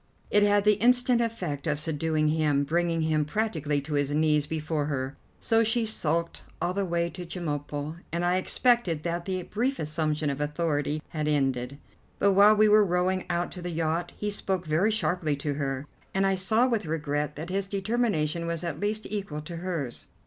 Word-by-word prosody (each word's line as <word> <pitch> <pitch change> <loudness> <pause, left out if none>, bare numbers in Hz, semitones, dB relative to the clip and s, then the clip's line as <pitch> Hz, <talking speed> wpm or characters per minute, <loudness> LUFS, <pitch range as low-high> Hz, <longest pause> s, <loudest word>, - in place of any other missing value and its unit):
It 205 - +5
had 205 0 +4
the 210 -1 +4
instant 245 0 +4
effect 180 -11 -3
of 150 -1 0
subduing 155 0 0
him, 150 -2 +2
bringing 165 +2 0
him 155 -1 +2
practically 155 -5 -1
to 150 +2 -6
his 145 -1 +1
knees 150 0 +2
before 155 -1 -2
her. 135 -2 -3 0.2
So 225 0 +3
she 225 +1 +1
sulked 170 -6 -1 0.2
all 175 +1 -1
the 200 +1 0
way 170 -1 0
to 180 - -7
Chemulpo, 150 -3 -4
and 170 +1 -1
I 180 +1 +2
expected 185 -5 +1
that 170 0 -2
the 185 -1 -2
brief 250 +9 -1
assumption 155 -1 -1
of 140 +1 -4
authority 150 0 -1
had 155 -2 -2
ended; 135 -3 0 0.4
but 200 - +4
while 205 +2 +7
we 215 +1 +5
were 210 0 +6
rowing 185 0 0
out 175 0 -1
to 180 - -8
the 175 - -4
yacht 165 +1 -1
he 210 0 -2
spoke 190 -3 -2
very 160 +7 +2
sharply 180 -8 0
to 145 +1 -3
her, 135 -1 -3 0.3
and 195 0 +3
I 195 - +3
saw 220 +6 +3
with 230 -9 -1
regret 150 -2 -2
that 160 +4 -6
his 195 0 -1
determination 195 -6 0
was 170 -1 -2
at 165 -3 -3
least 210 +2 -1
equal 195 -8 -4
to 165 +3 -7
hers. 165 -8 -3
170 Hz, 190 wpm, -27 LUFS, 150-195 Hz, 0.4 s, while